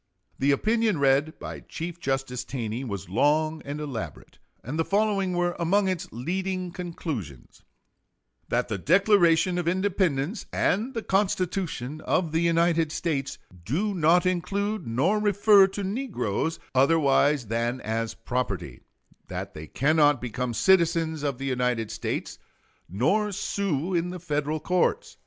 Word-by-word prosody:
The 135 Hz, -, +2 dB
opinion 220 Hz, +6 st, +2 dB
read 140 Hz, +2 st, +2 dB
by -, -, -7 dB
Chief 170 Hz, +1 st, -7 dB
Justice 135 Hz, -4 st, -2 dB
Taney 120 Hz, -1 st, -4 dB
was 100 Hz, -9 st, -5 dB
long 155 Hz, -, +1 dB
and 145 Hz, +1 st, -5 dB
elaborate, 140 Hz, -7 st, -7 dB, 0.2 s
and 140 Hz, +7 st, -4 dB
the -, -, +3 dB
following 200 Hz, -1 st, +1 dB
were 175 Hz, 0 st, 0 dB
among 190 Hz, +4 st, +2 dB
its 185 Hz, -1 st, -2 dB
leading 185 Hz, +7 st, -3 dB
conclusions: 155 Hz, -, -6 dB, 0.9 s
That -, -, 0 dB
the 100 Hz, -, -3 dB
Declaration 180 Hz, -, +4 dB
of 175 Hz, -, -3 dB
Independence 185 Hz, -, 0 dB
and 225 Hz, +8 st, 0 dB
the 225 Hz, -, -2 dB
Constitution 185 Hz, -7 st, -1 dB
of 170 Hz, -4 st, 0 dB
the 160 Hz, -, +1 dB
United 170 Hz, -1 st, +2 dB
States 145 Hz, -5 st, -2 dB, 0.3 s
do 180 Hz, -, -1 dB
not 175 Hz, +1 st, +3 dB
include 200 Hz, -, -1 dB
nor 150 Hz, -, +1 dB
refer 205 Hz, -1 st, +5 dB
to 195 Hz, +1 st, -5 dB
negroes 190 Hz, -, -2 dB, 0.2 s
otherwise 140 Hz, -1 st, +3 dB
than 115 Hz, +3 st, -1 dB
as 115 Hz, +1 st, -2 dB
property; 100 Hz, -, -3 dB, 0.5 s
that -, -, -6 dB
they 75 Hz, 0 st, -8 dB
cannot 145 Hz, -, +3 dB
become 125 Hz, 0 st, -3 dB
citizens 165 Hz, -, +3 dB
of 140 Hz, -3 st, -2 dB
the 135 Hz, -, -5 dB
United 125 Hz, -4 st, -1 dB
States -, -, -4 dB, 0.5 s
nor 200 Hz, -, +1 dB
sue 190 Hz, -4 st, -2 dB
in 175 Hz, 0 st, 0 dB
the 180 Hz, 0 st, -6 dB
Federal 150 Hz, -2 st, -2 dB
courts. 180 Hz, +3 st, 0 dB
160 Hz, 135 wpm, -26 LUFS, 135-185 Hz, 0.9 s, refer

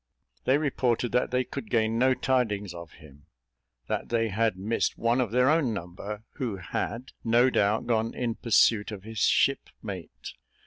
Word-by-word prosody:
They 130 Hz, -, +4 dB
reported 125 Hz, -5 st, 0 dB
that 125 Hz, +1 st, +1 dB
they 125 Hz, 0 st, +1 dB
could 115 Hz, -3 st, -7 dB
gain 115 Hz, 0 st, +1 dB
no 130 Hz, +1 st, +4 dB
tidings 105 Hz, -9 st, 0 dB
of 85 Hz, -2 st, -10 dB
him: 75 Hz, -1 st, -17 dB, 0.6 s
that -, -, -3 dB
they 115 Hz, -1 st, +1 dB
had 110 Hz, -1 st, 0 dB
missed 105 Hz, +5 st, -1 dB
one 120 Hz, +2 st, +2 dB
of 120 Hz, -, -1 dB
their 125 Hz, +3 st, +3 dB
own 145 Hz, -7 st, +2 dB
number, 100 Hz, +4 st, -7 dB
who 125 Hz, -7 st, -2 dB
had, 115 Hz, +7 st, -4 dB
no 120 Hz, +3 st, +4 dB
doubt, 105 Hz, 0 st, +2 dB
gone 115 Hz, -1 st, 0 dB
in 120 Hz, -2 st, -1 dB
pursuit 110 Hz, -2 st, +3 dB
of 100 Hz, -3 st, -7 dB
his 110 Hz, 0 st, -6 dB
shipmate. -, -, -1 dB
115 Hz, 165 wpm, -27 LUFS, 105-125 Hz, 0.6 s, They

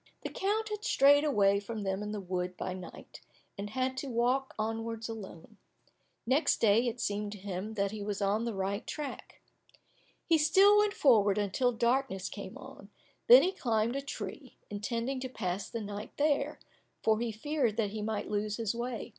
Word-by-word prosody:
The -, -, -3 dB
count 430 Hz, +3 st, -1 dB
had 420 Hz, 0 st, -5 dB
strayed 285 Hz, -, +5 dB
away 200 Hz, -9 st, +3 dB
from 210 Hz, +1 st, -5 dB
them 195 Hz, 0 st, -2 dB
in 210 Hz, 0 st, -4 dB
the 210 Hz, -, -3 dB
wood 180 Hz, -1 st, -3 dB
by 185 Hz, -, -3 dB
night, 185 Hz, -1 st, -10 dB, 0.3 s
and 200 Hz, +1 st, -5 dB
had 260 Hz, +3 st, -1 dB
to 275 Hz, -, -4 dB
walk 250 Hz, +3 st, 0 dB
onwards 225 Hz, +1 st, -3 dB
alone. 215 Hz, -3 st, -9 dB, 0.7 s
Next 265 Hz, +7 st, +3 dB
day 225 Hz, +3 st, +4 dB
it 240 Hz, +1 st, -3 dB
seemed 205 Hz, -1 st, -2 dB
to -, -, -8 dB
him 200 Hz, +2 st, -5 dB
that 200 Hz, -1 st, 0 dB
he 215 Hz, -1 st, -6 dB
was 205 Hz, -1 st, -3 dB
on 205 Hz, +2 st, +1 dB
the 235 Hz, -3 st, -3 dB
right 195 Hz, +4 st, -2 dB
track. 295 Hz, -3 st, -6 dB, 0.8 s
He 330 Hz, -2 st, +4 dB
still 390 Hz, +7 st, +6 dB
went 415 Hz, -1 st, +2 dB
forward, 210 Hz, -7 st, +4 dB
until 210 Hz, +5 st, +1 dB
darkness 235 Hz, -4 st, 0 dB
came -, -, -8 dB
on, -, -, -12 dB, 0.4 s
then -, -, +10 dB
he 370 Hz, -, +2 dB
climbed 230 Hz, -, 0 dB
a 275 Hz, -, -1 dB
tree, 255 Hz, 0 st, -7 dB
intending 230 Hz, +5 st, -2 dB
to 260 Hz, 0 st, -4 dB
pass 195 Hz, -5 st, -3 dB
the 230 Hz, -, -4 dB
night 205 Hz, 0 st, -6 dB
there, 290 Hz, -1 st, +1 dB, 0.5 s
for 220 Hz, -1 st, +3 dB
he 235 Hz, -1 st, -1 dB
feared 245 Hz, 0 st, -1 dB
that 210 Hz, -3 st, 0 dB
he 215 Hz, 0 st, -4 dB
might 215 Hz, 0 st, -2 dB
lose 210 Hz, 0 st, -2 dB
his 225 Hz, -2 st, -1 dB
way. 240 Hz, 0 st, -4 dB
225 Hz, 185 wpm, -31 LUFS, 205-265 Hz, 0.8 s, then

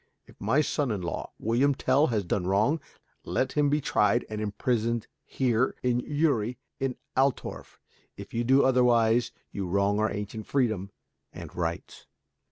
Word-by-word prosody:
If -, -, -20 dB
my 150 Hz, -, +3 dB
son 145 Hz, -2 st, -1 dB
in 100 Hz, -5 st, -2 dB
law, 85 Hz, -, -4 dB
William 130 Hz, +6 st, +2 dB
Tell, 135 Hz, +5 st, +3 dB
has 105 Hz, -5 st, -1 dB
done 90 Hz, +1 st, -1 dB
wrong, 110 Hz, +12 st, +2 dB, 0.4 s
let 130 Hz, -, -1 dB
him 145 Hz, -1 st, +2 dB
be 150 Hz, +1 st, +2 dB
tried 110 Hz, -4 st, +2 dB
and 105 Hz, 0 st, -3 dB
imprisoned 115 Hz, +2 st, -1 dB, 0.2 s
here, 125 Hz, -1 st, +1 dB
in 125 Hz, -1 st, +2 dB
Uri, 125 Hz, -5 st, 0 dB, 0.2 s
in 135 Hz, -2 st, -1 dB, 0.2 s
Altorf. 135 Hz, 0 st, -1 dB, 0.4 s
If 100 Hz, 0 st, -10 dB
you 120 Hz, +1 st, 0 dB
do 135 Hz, +3 st, +4 dB
otherwise 120 Hz, -2 st, +3 dB, 0.2 s
you 95 Hz, -2 st, -4 dB
wrong 100 Hz, +3 st, +1 dB
our 110 Hz, +1 st, +2 dB
ancient 105 Hz, +1 st, -5 dB
freedom 110 Hz, -8 st, 0 dB, 0.4 s
and -, -, -10 dB
rights." 85 Hz, -1 st, -4 dB
120 Hz, 155 wpm, -28 LUFS, 105-130 Hz, 0.4 s, do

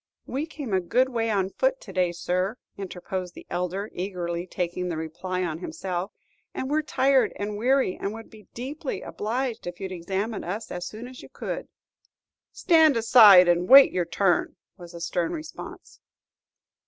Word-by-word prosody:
"We 280 Hz, +5 st, -3 dB
came 285 Hz, -9 st, -6 dB
a 190 Hz, -, +2 dB
good 250 Hz, +9 st, +2 dB
way 230 Hz, -2 st, -1 dB
on 195 Hz, -3 st, 0 dB
foot -, -, 0 dB
to -, -, -11 dB
day, 180 Hz, -2 st, +1 dB
sir," 185 Hz, +5 st, -2 dB, 0.2 s
interposed 185 Hz, -1 st, -6 dB
the -, -, -11 dB
elder, 180 Hz, +3 st, -2 dB
eagerly, 175 Hz, -2 st, -4 dB
taking 180 Hz, 0 st, -3 dB
the 165 Hz, -, -3 dB
reply 180 Hz, +4 st, -4 dB
on 160 Hz, -2 st, -3 dB
himself, 185 Hz, +1 st, -4 dB, 0.4 s
"and 260 Hz, +2 st, -3 dB
we 300 Hz, -, +2 dB
're -, -, 0 dB
tired 270 Hz, -3 st, +2 dB
and 205 Hz, +1 st, -4 dB
weary, 255 Hz, -1 st, +1 dB
and 200 Hz, -, -3 dB
would 225 Hz, +1 st, -10 dB
be 215 Hz, -1 st, -16 dB
deeply 270 Hz, +4 st, -5 dB
obliged 235 Hz, 0 st, -3 dB
if 175 Hz, 0 st, -6 dB
you'd 190 Hz, -1 st, -5 dB
examine 195 Hz, +5 st, -3 dB
us 200 Hz, +6 st, -5 dB
as 175 Hz, 0 st, -4 dB
soon 220 Hz, +4 st, -8 dB
as 255 Hz, 0 st, -11 dB
you -, -, -13 dB
could." -, -, -5 dB, 0.8 s
"Stand 320 Hz, -6 st, +4 dB
aside 220 Hz, -6 st, +8 dB
and 175 Hz, +1 st, +2 dB
wait 275 Hz, +1 st, +10 dB
your 180 Hz, -1 st, 0 dB
turn," 175 Hz, +2 st, +1 dB, 0.2 s
was 175 Hz, -2 st, -12 dB
the 170 Hz, -, -9 dB
stern 170 Hz, 0 st, -1 dB
response. 315 Hz, -1 st, -9 dB
195 Hz, 175 wpm, -25 LUFS, 180-250 Hz, 0.8 s, wait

